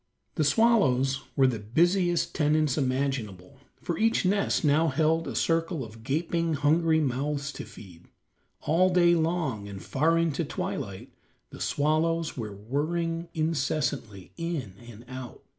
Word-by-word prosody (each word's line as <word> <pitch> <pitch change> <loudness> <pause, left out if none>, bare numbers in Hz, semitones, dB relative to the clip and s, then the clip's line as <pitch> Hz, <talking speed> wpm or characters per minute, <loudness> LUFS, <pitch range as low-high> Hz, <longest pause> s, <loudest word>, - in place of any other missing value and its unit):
The 155 - 0
swallows 135 - +3
were 135 - +4
the 125 -4 +1
busiest 175 - +1
tenants 150 -2 +2
imaginable, 130 - -2 0.2
for 170 - -3
each 225 -3 +2
nest 200 -3 +1
now 150 +3 +4
held 160 +3 +1
a - - -5
circle 165 -2 0
of 110 0 -13
gaping, 165 +4 0
hungry 160 +3 +3
mouths 140 +1 -1
to - - -7
feed. 90 -4 -14 0.5
All 170 +5 +3
day 175 -1 +5
long, 160 -11 -1
and 100 -1 -7
far 160 - +1
into 165 -4 0
twilight, - - -5 0.4
the - - -10
swallows 160 +2 0
were 115 -4 -4
whirring 165 - -2
incessantly, 135 - -2
in 165 - -4
and 120 0 -12
out. 130 -1 -9
150 Hz, 135 wpm, -27 LUFS, 130-165 Hz, 0.5 s, day